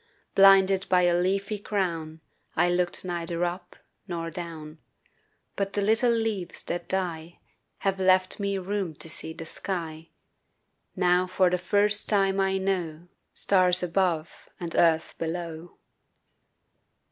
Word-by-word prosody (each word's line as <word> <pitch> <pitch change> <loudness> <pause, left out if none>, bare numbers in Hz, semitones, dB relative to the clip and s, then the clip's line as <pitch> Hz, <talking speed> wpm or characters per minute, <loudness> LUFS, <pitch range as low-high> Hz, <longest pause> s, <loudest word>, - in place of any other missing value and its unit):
Blinded 195 -1 +5
by 180 -1 +4
a 175 -1 +3
leafy 195 +4 0
crown 165 -6 -3 0.3
I 175 +2 +3
looked 175 +1 -1
neither 170 -1 -2
up 175 +1 -6 0.3
nor 165 -2 -4
down 160 -2 -8 0.8
But 200 0 -2
the 205 - 0
little 225 +4 +3
leaves 225 -6 -2
that 175 - -4
die 175 -3 -3 0.4
Have 195 -1 -1
left 185 +1 +2
me 200 -1 -1
room 190 -3 -3
to 165 - -6
see 160 0 -2
the 165 0 -8
sky; 165 -3 -5 0.9
Now 180 -1 +2
for 185 0 +2
the 180 - 0
first 205 +2 +1
time 195 -2 +2
I 195 0 +1
know 180 -3 -3 0.2
Stars 180 -2 +3
above 170 -2 -1
and 170 -2 -5
earth 165 -1 +2
below. 165 0 -5
180 Hz, 130 wpm, -26 LUFS, 170-195 Hz, 0.9 s, Blinded